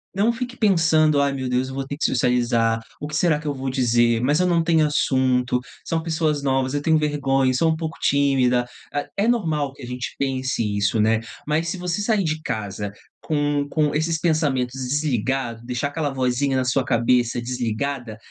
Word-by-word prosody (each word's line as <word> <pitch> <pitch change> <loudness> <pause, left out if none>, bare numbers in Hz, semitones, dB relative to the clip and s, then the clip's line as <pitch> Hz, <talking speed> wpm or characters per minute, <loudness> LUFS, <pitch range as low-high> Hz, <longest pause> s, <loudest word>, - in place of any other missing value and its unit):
não 215 +4 +3
fique 250 +1 -5
pensando: 160 -7 +3
"Ai 140 -1 +1
meu 130 -2 -3
Deus, 125 +1 0
eu 130 - -7
vou 135 0 -3
ter 140 +1 -6
que - - -1
socializar, 120 -2 +2 0.2
o 150 - -5
que 150 - -5
será 160 -2 +3
que 155 - -13
eu 145 - 0
vou 135 0 -4
dizer? 120 -2 +2
Mas 145 +6 +2
eu 180 - +3
não 170 -2 +2
tenho 160 -2 +3
assunto, 130 -3 +1 0.3
são 165 -1 -1
pessoas 160 -3 0
novas, 135 -1 0
eu 145 - -1
tenho 160 +1 +3
vergonha, 135 -3 +1
e - - -1
sou 160 +5 +2
um 160 - 0
pouco 160 0 -5
tímida". 130 -3 +2 0.3
Ah, 145 - -2
é 205 +3 +2
normal 155 - 0
que - - -13
a - - -5
gente 125 +1 -5
pense 130 -2 -1
isso, 100 +2 +1
né, 110 +1 +3 0.3
mas 155 +3 0
se 185 +3 -3
você 180 +2 -2
sair 210 -2 +1
de 155 -1 -2
casa 105 -4 -4 0.3
com 145 -2 0
com 150 -2 +1
esses 160 +2 0
pensamentos 140 -6 0
desligado, 130 -4 -1
deixar 125 +3 -2
aquela 150 -1 -2
vozinha 130 +1 0
na 130 - +1
sua 130 +1 +1
cabeça 120 0 +2
desligada, 120 0 -3
140 Hz, 200 wpm, -22 LUFS, 125-155 Hz, 0.3 s, não